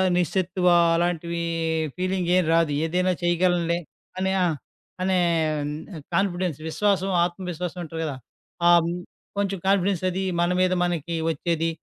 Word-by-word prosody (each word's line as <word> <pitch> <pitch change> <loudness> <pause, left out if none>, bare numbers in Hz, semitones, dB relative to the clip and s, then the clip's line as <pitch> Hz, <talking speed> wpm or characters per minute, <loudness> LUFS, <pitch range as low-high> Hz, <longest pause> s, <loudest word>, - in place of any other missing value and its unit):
నిస్సత్తువా 180 0 +2 0.2
అలాంటివి 170 0 -1 0.6
ఫీలింగ్ 185 -1 -1
ఏం 185 - +4
రాదు. 165 -3 +3
ఏదైనా 180 +3 +1
చేయగలనే 175 -1 +2 0.4
అనే 190 0 +1
ఆ! - - +3 0.6
అనే 185 0 +2 1.0
కాన్ఫిడెన్స్ 180 -5 0
విశ్వాసం, 195 +1 +1 0.2
ఆత్మవిశ్వాసం 180 -1 -5
ఉంటారు 165 0 -5
కదా! 145 -4 -3 0.5
ఆ - - +7 0.7
కొంచెం 195 -1 0
కాన్ఫిడెన్స్ 195 -2 +2
అది 190 +2 -2 0.2
మన 175 - +2
మీద 185 0 +3
మనకి 170 -1 -2 0.2
వచ్చేది. 165 +1 -1
175 Hz, 115 wpm, -24 LUFS, 170-185 Hz, 1.0 s, ఆ